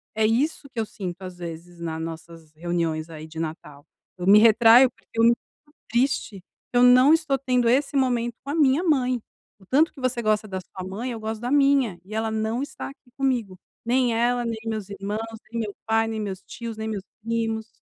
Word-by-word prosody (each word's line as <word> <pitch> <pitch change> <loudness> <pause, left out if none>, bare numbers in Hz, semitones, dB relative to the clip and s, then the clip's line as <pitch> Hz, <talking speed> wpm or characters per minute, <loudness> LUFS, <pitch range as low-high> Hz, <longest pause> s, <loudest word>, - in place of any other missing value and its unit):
é 220 0 +2
isso 275 +7 0
que 230 - -4
eu 220 - 0
sinto, 190 -3 -7
às 185 -1 -8
vezes 170 0 -8
na 160 -1 -4
nossas 165 -1 -8
reuniões 165 -1 -2
aí, 155 -1 -9
de 160 0 -12
Natal. 155 -3 -6 0.3
Eu 180 - -4
me 205 +2 +8
retraio 230 +3 +7
porque - - -31
é - - +6
muito 235 +1 +5 0.5
triste 240 -4 0 0.3
que 245 - +1
eu 245 - +6
não 255 +4 +7
estou 320 -4 +2
tendo 250 -2 +1
esse 275 +4 +2
momento 240 -3 +1
com 280 - -5
a - - -2
minha 295 +1 +3
mãe. 255 -7 +2 0.4
O 190 - -19
tanto 295 - +3
que - - -15
você 255 -2 -1
gosta 215 -1 +1
da 190 -2 -4
sua 185 0 -9
mãe 230 +7 -4
eu 230 - -5
gosto 220 0 -4
da 245 - -2
minha 275 -9 +3
e 210 - -10
ela 220 0 -1
não 220 +3 -1
está 285 - -6
aqui 270 -2 -17
comigo, 245 -8 -1 0.3
nem 245 0 +2
ela, 240 +1 +1
nem 230 -1 -2
meus 215 -3 -3
irmãos, 200 +1 -4 0.3
nem 235 0 -2
meu 205 -2 -4
pai, 225 0 +2
nem 220 -1 -3
meus 195 -2 -5
tios, 230 -2 -7
nem 220 0 -4
meus 205 -3 -4 0.2
primos, 225 -1 -2
225 Hz, 210 wpm, -24 LUFS, 190-250 Hz, 0.5 s, me